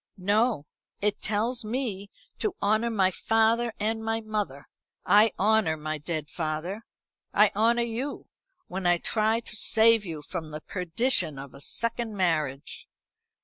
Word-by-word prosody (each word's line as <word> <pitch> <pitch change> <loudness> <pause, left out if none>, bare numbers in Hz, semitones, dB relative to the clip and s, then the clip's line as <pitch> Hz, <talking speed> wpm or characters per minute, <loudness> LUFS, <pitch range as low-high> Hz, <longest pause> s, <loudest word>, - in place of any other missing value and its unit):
"No. 205 - +1 0.3
It 205 0 0
tells 230 +4 0
me 215 -4 -3 0.3
to 410 -4 -1
honour 215 +3 +2
my 195 -4 +2
father 225 +4 +2
and 220 +1 -1
my 225 0 0
mother. 210 -11 -4 0.4
I 210 +1 +6
honour 210 -6 +2
my 155 0 -4
dead 155 0 -4
father, 165 +7 -4 0.5
I 205 0 +6
honour 235 +3 +3
you, 235 +5 -4 0.4
when 185 0 -3
I 175 0 +4
try 220 +5 +1
to 225 - -6
save 225 0 +4
you 160 -5 -6
from 160 0 -5
the 155 0 -7
perdition 180 - +1
of 135 0 -9
a - - -12
second 230 - -2
marriage." 155 -7 -1
210 Hz, 145 wpm, -27 LUFS, 165-225 Hz, 0.5 s, I